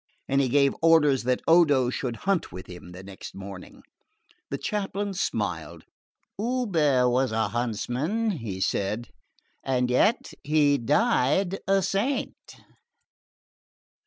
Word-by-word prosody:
And 135 +1 +2
he 130 - 0
gave 140 +1 +3
orders 150 -6 +4
that 125 0 0
Odo 145 -7 +4
should 125 -2 -3
hunt 195 -3 0
with 90 +2 -9
him 90 -1 -11
next 95 +2 -10
morning. 95 -1 -10 0.7
The - - -3
chaplain 200 -1 -3
smiled. 100 - -3 0.6
"Hubert 175 - +1
was 130 0 +1
a 110 0 0
huntsman," 125 - -1 0.3
said 105 +5 -1
he, - - -27 0.5
"and 125 -1 0
yet 210 - +2
he 145 -1 +3
died 190 - +1
a 195 0 +3
saint." 240 +10 -2
140 Hz, 115 wpm, -26 LUFS, 120-195 Hz, 0.7 s, orders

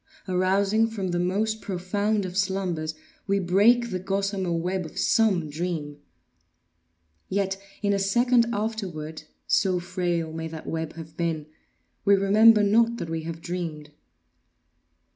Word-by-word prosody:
Arousing 195 +4 +2
from 205 -5 -4
the 175 0 -1
most 210 +5 0
profound 200 +2 -1
of 180 -1 -6
slumbers, 185 -5 -1 0.3
we 200 0 +2
break 210 +6 +3
the 185 - -2
gossamer 195 -1 -1
web 180 +3 -1
of 160 - -10
some 195 -8 +2
dream. 150 -2 -4 1.3
Yet 195 0 -1 0.2
in 200 0 +2
a 200 - +1
second 240 +4 +3
afterward, 185 -9 -4 0.2
(so 185 -2 +2
frail 175 -2 -2
may 160 0 -4
that 160 -1 -8
web 160 -1 -3
have 160 -1 -10
been) 165 -3 -1 0.6
we 200 0 +5
remember 210 +3 +6
not 230 +3 +3
that 165 - -5
we 160 -1 -3
have 165 0 -6
dreamed. 165 -4 -5
185 Hz, 135 wpm, -26 LUFS, 165-205 Hz, 1.3 s, remember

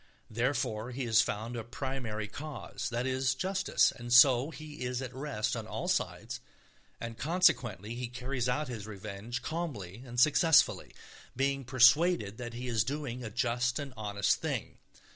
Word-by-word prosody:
Therefore 115 -1 -1
he 130 +1 -4
has 115 0 +5
found 115 +1 -3
a 115 - -4
primary 120 -3 -4
cause, 145 +4 -6
that 120 +1 -2
is, 130 0 +1
justice. 190 +5 +2
And 120 0 -9
so 125 +2 +7
he 155 -3 -8
is 125 0 -2
at 130 -1 -5
rest 135 -5 -2
on - - -5
all - - -4
sides, - - -1 0.6
and 115 -1 -6
consequently 120 - +2
he 125 +1 -4
carries 125 0 -3
out 150 +4 0
his 110 -4 -6
revenge 105 +4 -6
calmly 120 - -4
and 120 -2 -5
successfully, 155 +4 +4 0.4
being 135 +1 0
persuaded 130 - +4
that 120 -1 -6
he 125 +1 -5
is 115 -4 +2
doing 130 -1 -4
a 115 - -4
just 125 +1 0
and 140 -3 -5
honest 100 -2 +1
thing. - - -3
125 Hz, 160 wpm, -31 LUFS, 115-135 Hz, 0.6 s, so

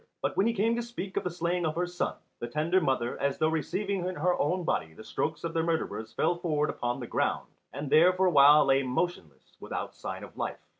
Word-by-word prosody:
But - - -1
when 200 - +3
he 230 - +1
came 225 +2 +1
to 240 - -1
speak 230 -5 -6
of - - 0
the 180 - -1
slaying 175 +1 -1
of 155 -1 -1
her 175 +1 0
son, 175 0 -3 0.2
the 120 - -4
tender 160 +8 +1
mother, 130 -6 -1
as 140 -1 0
though 155 - +2
receiving 185 +5 -2
in 185 - -3
her 180 +4 +1
own 180 +5 0
body 80 - -2
the 110 - -11
strokes 155 +7 -3
of 165 -1 -3
the 165 - +1
murderers 160 -9 -2
fell 170 +2 +1
forward 150 -4 0
upon 120 +1 -3
the 125 - -5
ground, - - -1 0.2
and 145 +1 -5
there 155 +6 +6
for 185 +1 +1
a 180 - +4
while 145 0 +7
lay 135 0 +4
motionless 130 - -3
without - - -5
sign - - -6
of - - -11
life. - - -3
165 Hz, 240 wpm, -29 LUFS, 140-180 Hz, 0.2 s, while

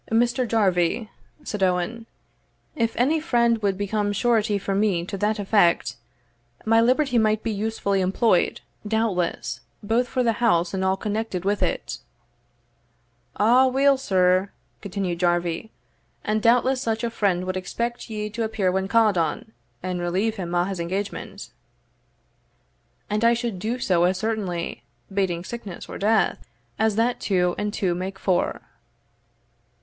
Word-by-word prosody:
"Mr. 240 +2 +2
Jarvie," 205 0 +1 0.3
said 210 - -5
Owen, 190 +5 0 0.7
"if 230 -5 0
any 285 +7 +2
friend 235 -7 +2
would 200 -2 0
become 205 +1 -1
surety 220 -1 +1
for 200 0 -3
me 195 -4 +1
to 200 - -5
that 210 +3 0
effect, 185 - +2 0.7
my 225 +1 +4
liberty 255 +1 +3
might 215 -1 +1
be 230 - -1
usefully 205 -2 -1
employed, 190 +1 +2 0.3
doubtless, 190 - -1 0.2
both 230 +4 +1
for 255 +1 0
the 230 -1 0
house 175 -7 +2
and 190 -1 -1
all 190 0 +1
connected 210 -3 -3
with 205 +1 0
it." - - -2 1.4
"Aweel, 260 +5 +5
sir," 185 -6 +2 0.3
continued 190 -4 -3
Jarvie, 175 +2 0 0.5
"and 215 0 0
doubtless 250 +3 +3
such 225 -1 -1
a 235 - -1
friend 190 -5 0
wad 185 0 -2
expect 235 +7 -4
ye 210 -1 -3
to 230 +3 -4
appear 215 -4 0
when 190 +1 -1
ca'd 215 -3 +3
on, 165 +7 -2 0.3
and 180 -1 -2
relieve 195 +6 0
him 175 -2 -4
o' 175 - +3
his 190 -1 -4
engagement." 190 +4 -4 1.6
"And 210 +2 -1
I 235 0 +5
should 235 -5 -3
do 225 +5 -2
so 175 -7 +2
as 185 +1 +1
certainly, 195 -5 -3 0.3
bating 185 -4 0
sickness 210 -4 -7
or - - -7
death, 215 +2 +2 0.4
as 220 -1 +2
that 235 +3 +1
two 180 -3 +1
and 210 0 -1
two 190 -4 0
make 185 +2 -4
four." 185 -2 0
210 Hz, 145 wpm, -24 LUFS, 185-230 Hz, 1.6 s, Aweel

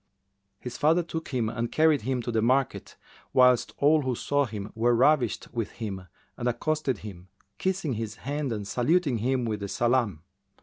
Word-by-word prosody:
His 125 -1 -7
father 165 +4 +3
took 160 -1 -5
him 125 -5 -1
and 115 +1 -3
carried 155 -2 +3
him 125 +1 -2
to 120 - -3
the 115 -1 +1
market, 130 +3 0 0.4
whilst 125 -1 +4
all 150 +2 +4
who 130 -3 -1
saw 145 +3 0
him 105 -1 -6
were 120 +2 +2
ravished 130 -1 +2
with 115 -4 -3
him 95 -5 -6 0.3
and 120 - -2
accosted 135 +1 -1
him, 95 -3 -9 0.3
kissing 185 -7 -1
his 110 -1 -4
hand 145 +1 -3
and 105 -3 -4
saluting 140 - +1
him 125 +2 0
with 110 -2 -2
the 100 - -4
salam. 120 -7 0
125 Hz, 175 wpm, -27 LUFS, 110-145 Hz, 0.4 s, whilst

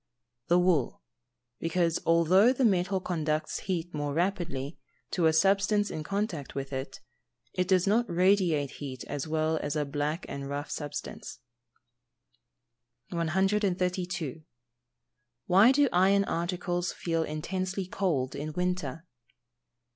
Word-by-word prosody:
_ - - -54
The 175 - +4
wool, 175 - +1 0.6
because, 165 0 +1
although 170 +7 +5
the 260 0 +1
metal 190 -2 +2
conducts 155 -4 -2
heat 175 -2 -3
more 145 -1 -2
rapidly, 170 -6 -2 0.3
to 170 -3 +2
a - - +5
substance 200 +4 +3
in 155 - -4
contact 190 -4 -3
with 135 0 -4
it, 130 +1 -5 0.5
it 180 -1 0
does 185 -2 +3
not 225 +4 +2
radiate 175 -5 +2
heat 130 -3 -6
as 145 +1 -4
well 160 0 0
as 145 +1 -3
a 150 -1 0
black 145 +4 -2
and 140 0 -6
rough 145 +2 -4
substance. 145 -1 -6 1.7
132. 180 - 0 1.1
_Why 195 +7 +7
do 285 +1 +4
iron 195 +3 +4
articles 175 0 -2
feel 165 -1 -1
intensely 185 +5 -3
cold 170 -9 -1
in 150 +2 -5
winter? 180 -3 -2
175 Hz, 125 wpm, -29 LUFS, 155-190 Hz, 1.7 s, Why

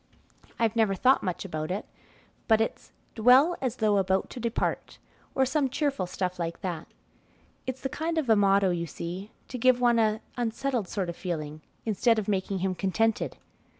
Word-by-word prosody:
I've 230 -1 +1
never 220 -4 +3
thought 260 +7 +4
much 180 +1 -3
about 155 -4 -4
it, 195 +3 -3 0.6
but 220 -1 +5
it's 225 - -2 0.2
'Dwell 255 +9 +5
as 255 -3 -1
though 210 -4 +2
about 190 0 0
to - - -7
depart,' 235 -1 -2 0.4
or 265 - +4
some 270 +1 +1
cheerful 275 - -1
stuff 180 0 -3
like 170 -1 -3
that. 175 -4 -4 0.8
It's 260 0 -4
the - - -1
kind 320 +5 -3
of 310 -5 0
a 220 - +6
motto, 195 -2 +4
you 170 -1 -2
see, 175 +6 -6 0.2
to 250 - -6
give 255 +1 +4
one 240 -1 +4
an 220 0 +2 0.2
unsettled 240 -1 -1
sort 190 -3 -2
of 170 - -4
feeling, 155 -4 -4 0.2
instead 225 +2 +2
of 215 - -2
making 195 -1 0
him 190 - 0
contented." 210 +4 0
215 Hz, 180 wpm, -28 LUFS, 185-245 Hz, 0.8 s, a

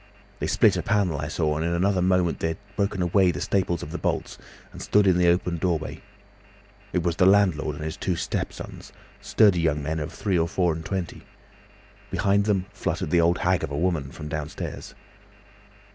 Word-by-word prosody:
They - - -2
split - - +3
a - - 0
panel, 95 -8 0
I 70 - -3
saw, 75 -1 -1
and 80 - -1
in 85 +1 0
another 95 +2 +1
moment 90 -2 +2
they - - 0
had 100 +5 -7
broken 100 -2 0
away 90 +1 +3
the 80 -4 -2
staples 90 -3 0
of - - -7
the - - -4
bolts - - -2 0.3
and - - -10
stood 105 0 +3
in 95 -2 +4
the 90 - +4
open 85 0 +2
doorway. 80 -3 -2 0.9
It 90 - 0
was 85 -1 -1
the 90 -1 +5
landlord 90 -7 +3
and 75 - -6
his 80 - -5
two 90 - -1
step - - -2
sons, - - -10 0.3
sturdy 100 -5 +4
young 75 -3 0
men 80 +2 -2
of 75 - -4
three 95 -4 -1
or 80 - +1
four 85 0 +1
and 80 +1 -6
twenty. 95 0 -4 0.9
Behind 100 +1 +1
them 100 -3 +1
fluttered 95 - -3
the 85 - +4
old 85 +2 +3
hag 90 -1 +1
of 80 - -2
a 70 - -4
woman 80 -5 -1
from 75 - -8
downstairs. 75 -1 -6
85 Hz, 205 wpm, -25 LUFS, 80-95 Hz, 0.9 s, the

